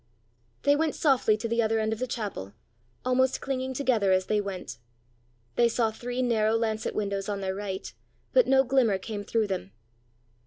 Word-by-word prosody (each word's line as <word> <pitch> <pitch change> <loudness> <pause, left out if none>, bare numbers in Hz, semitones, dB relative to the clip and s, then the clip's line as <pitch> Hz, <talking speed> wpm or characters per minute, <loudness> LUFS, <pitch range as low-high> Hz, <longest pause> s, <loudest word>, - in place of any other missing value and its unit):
They 285 - +5
went 315 0 0
softly 255 -7 +3
to 220 - -3
the 230 +1 +1
other 225 0 +1
end 220 0 0
of 220 - -6
the 255 - -2
chapel, 200 - -5 0.5
almost 255 +1 +2
clinging 260 -1 -3
together 240 -8 +2
as 185 0 +3
they 210 +1 +1
went. 190 - -6 0.8
They 235 -1 +5
saw 225 -1 +1
three 245 +3 -3
narrow 220 -2 +2
lancet 220 -1 -1
windows 200 -1 -2
on 200 -1 -2
their 190 -1 -1
right, 195 -1 -5 0.4
but - - +5
no 265 0 +5
glimmer 250 -6 +3
came 205 +2 -5
through 225 +1 +1
them. 110 - -4
220 Hz, 180 wpm, -27 LUFS, 200-255 Hz, 0.8 s, They